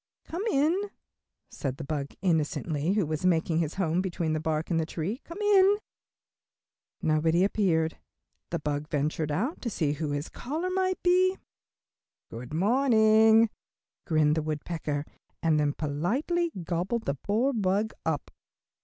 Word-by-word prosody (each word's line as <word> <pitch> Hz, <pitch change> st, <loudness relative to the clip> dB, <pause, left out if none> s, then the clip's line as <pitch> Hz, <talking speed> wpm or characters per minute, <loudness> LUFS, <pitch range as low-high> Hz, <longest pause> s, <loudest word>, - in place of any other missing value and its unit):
"Come 340 Hz, +3 st, -5 dB
in," 345 Hz, +7 st, +1 dB, 0.6 s
said 135 Hz, -2 st, -4 dB
the 150 Hz, -, -6 dB
bug, 140 Hz, -1 st, -4 dB
innocently, 160 Hz, -1 st, 0 dB
who 205 Hz, -4 st, +1 dB
was 155 Hz, +1 st, -3 dB
making 165 Hz, -2 st, +2 dB
his 160 Hz, -2 st, -1 dB
home 175 Hz, -2 st, +1 dB
between 170 Hz, -4 st, -2 dB
the 155 Hz, -, 0 dB
bark 155 Hz, +1 st, -2 dB
and 165 Hz, -, +2 dB
the 160 Hz, -, 0 dB
tree, 190 Hz, -, -4 dB
"come 335 Hz, -, -10 dB
in." 405 Hz, -1 st, +5 dB, 1.3 s
Nobody 160 Hz, +2 st, +3 dB
appearing, 175 Hz, -6 st, +2 dB, 0.6 s
the 170 Hz, -, -1 dB
bug 150 Hz, -1 st, -3 dB
ventured 150 Hz, 0 st, -1 dB
out 240 Hz, -, -2 dB
to 240 Hz, -, -2 dB
see 155 Hz, -8 st, 0 dB
who 150 Hz, +1 st, -3 dB
his 145 Hz, +2 st, -2 dB
caller 320 Hz, +8 st, -4 dB
might 370 Hz, 0 st, 0 dB
be. 370 Hz, +1 st, +4 dB, 0.9 s
"Good 120 Hz, +3 st, -8 dB
morning," 220 Hz, -, +4 dB, 0.6 s
grinned 155 Hz, -2 st, +3 dB
the 160 Hz, -, 0 dB
woodpecker, 150 Hz, -1 st, -3 dB, 0.4 s
and 160 Hz, -2 st, +3 dB
then 145 Hz, -1 st, +1 dB
politely 245 Hz, -, -1 dB
gobbled 180 Hz, +8 st, -2 dB
the 140 Hz, -, 0 dB
poor 220 Hz, -, 0 dB
bug 210 Hz, 0 st, 0 dB
up. -, -, -2 dB
170 Hz, 145 wpm, -28 LUFS, 155-235 Hz, 1.3 s, in